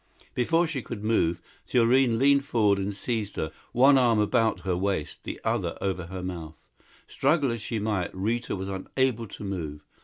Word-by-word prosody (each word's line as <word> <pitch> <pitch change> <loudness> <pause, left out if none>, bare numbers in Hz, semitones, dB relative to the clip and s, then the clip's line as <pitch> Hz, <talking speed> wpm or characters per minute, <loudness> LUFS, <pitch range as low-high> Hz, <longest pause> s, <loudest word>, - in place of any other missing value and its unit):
Before 165 +8 +2
she 150 -5 -3
could 110 -3 -7
move, 90 -6 +1 0.2
Thurene 120 0 +3
leaned 140 +2 +4
forward 105 -6 +2
and 100 +1 -3
seized 110 -1 -3
her 80 - -2 0.2
one 135 +2 +6
arm 120 -3 +4
about 110 -2 +2
her 90 0 -1
waist, 95 -4 -2
the - - -5
other - - -1
over 95 -3 -2
her 95 +1 -6
mouth. 85 -4 -6 0.5
Struggle 145 -5 +2
as 115 -2 -4
she 115 +2 -3
might, 105 -4 -1
Rita 115 +6 -1
was 95 0 -5
unable 115 +5 -1
to 100 - -9
move. 80 -7 -5
105 Hz, 175 wpm, -27 LUFS, 95-125 Hz, 0.5 s, one